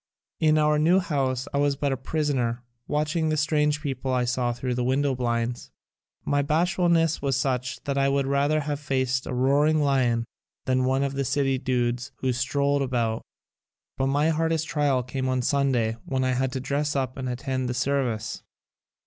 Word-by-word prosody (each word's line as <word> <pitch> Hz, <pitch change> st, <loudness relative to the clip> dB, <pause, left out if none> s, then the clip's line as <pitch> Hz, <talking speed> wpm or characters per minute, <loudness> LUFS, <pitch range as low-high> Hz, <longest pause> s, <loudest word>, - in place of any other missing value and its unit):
In 155 Hz, -1 st, +4 dB
our 150 Hz, 0 st, +3 dB
new 170 Hz, +5 st, +4 dB
house 135 Hz, -7 st, -1 dB
I 140 Hz, -, +1 dB
was 145 Hz, -1 st, +2 dB
but 140 Hz, 0 st, -1 dB
a -, -, +1 dB
prisoner, 130 Hz, -4 st, -1 dB, 0.2 s
watching 155 Hz, +2 st, 0 dB
the 155 Hz, -, 0 dB
strange 150 Hz, -1 st, +1 dB
people 135 Hz, -2 st, -3 dB
I 125 Hz, -1 st, +1 dB
saw 120 Hz, 0 st, 0 dB
thru 125 Hz, +1 st, -3 dB
the 125 Hz, 0 st, -1 dB
window 135 Hz, +2 st, +1 dB
blinds. 120 Hz, -1 st, -2 dB, 0.6 s
My 145 Hz, 0 st, +2 dB
bashfulness 165 Hz, +1 st, +2 dB
was 135 Hz, -2 st, 0 dB
such 130 Hz, -1 st, -2 dB
that 140 Hz, -1 st, -1 dB
I 135 Hz, 0 st, +3 dB
would 140 Hz, 0 st, +1 dB
rather 140 Hz, +3 st, +1 dB
have 145 Hz, 0 st, -3 dB
faced 130 Hz, -2 st, -1 dB
a -, -, -3 dB
roaring 145 Hz, +5 st, +3 dB
lion 130 Hz, -5 st, +2 dB, 0.4 s
than 130 Hz, 0 st, +1 dB
one 135 Hz, +1 st, +1 dB
of 140 Hz, -1 st, -1 dB
the 140 Hz, 0 st, -1 dB
city 135 Hz, 0 st, 0 dB
dudes 125 Hz, -1 st, -1 dB
who 130 Hz, -1 st, -1 dB
strolled 140 Hz, +2 st, +1 dB
about. 120 Hz, -4 st, -1 dB, 0.7 s
But 135 Hz, -, 0 dB
my 145 Hz, +3 st, +2 dB
hardest 160 Hz, 0 st, 0 dB
trial 145 Hz, -4 st, +1 dB
came 130 Hz, +1 st, -3 dB
on 130 Hz, -1 st, 0 dB
Sunday 125 Hz, -5 st, +1 dB
when 130 Hz, -1 st, -1 dB
I 130 Hz, -, +1 dB
had 130 Hz, +1 st, 0 dB
to 130 Hz, -, -2 dB
dress 140 Hz, +3 st, -1 dB
up 130 Hz, -2 st, -1 dB
and 130 Hz, -1 st, -4 dB
attend 130 Hz, +1 st, -2 dB
the 125 Hz, -, -2 dB
service. 120 Hz, -5 st, -1 dB
135 Hz, 185 wpm, -25 LUFS, 125-145 Hz, 0.7 s, In